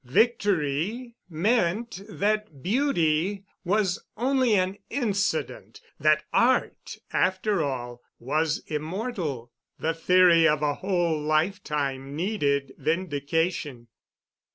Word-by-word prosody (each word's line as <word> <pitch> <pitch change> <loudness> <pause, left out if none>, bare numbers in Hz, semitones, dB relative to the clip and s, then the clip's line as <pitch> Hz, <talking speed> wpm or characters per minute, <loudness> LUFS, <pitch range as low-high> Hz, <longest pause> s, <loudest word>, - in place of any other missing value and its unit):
Victory 205 - 0 0.2
meant 195 +3 0
that 210 -8 -2
Beauty 195 - +1 0.2
was 190 -1 0
only 255 -1 +2
an 190 +1 0
incident—that 195 - -1
Art, 255 +2 +1 0.2
after 190 0 +1
all, 120 -3 -4 0.2
was 155 +5 -1
immortal. 155 - -4 0.3
The 165 - -1
theory 170 0 +5
of 150 -1 +1
a 145 -1 +2
whole 175 -2 0
lifetime 150 -4 -1
needed 145 -7 0
vindication. 150 -4 -1
170 Hz, 85 wpm, -26 LUFS, 150-205 Hz, 0.3 s, theory